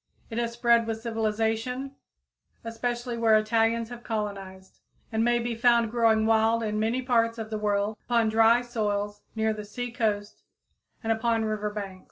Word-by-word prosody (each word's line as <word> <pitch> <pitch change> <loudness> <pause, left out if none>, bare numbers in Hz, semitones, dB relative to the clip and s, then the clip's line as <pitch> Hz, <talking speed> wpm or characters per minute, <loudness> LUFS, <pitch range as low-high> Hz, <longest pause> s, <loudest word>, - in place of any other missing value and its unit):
It 225 - -2
has 235 -1 -2
spread 235 -1 +3
with 225 -1 -3
civilization, 225 +4 -2 0.7
especially 240 +1 -3
where 225 -1 +5
Italians 225 +1 +1
have 240 -1 -9
colonized, 195 -4 -5 0.3
and 220 0 +1
may 240 0 +3
be 240 0 -2
found 235 -1 +3
growing 225 -2 +3
wild 225 +1 +3
in 215 -1 -1
many 230 +4 0
parts 230 -2 +1
of 220 -1 -6
the 215 - -2
world, 205 0 0
upon 235 -2 +2
dry 225 +2 +4
soils 205 -3 -2
near 220 0 +1
the 210 -1 -6
sea 245 +4 -5
coast 215 -3 -2 0.6
and 225 - 0
upon 225 0 0
river 215 -1 -2
banks. 200 -3 -6
225 Hz, 165 wpm, -27 LUFS, 215-235 Hz, 0.7 s, where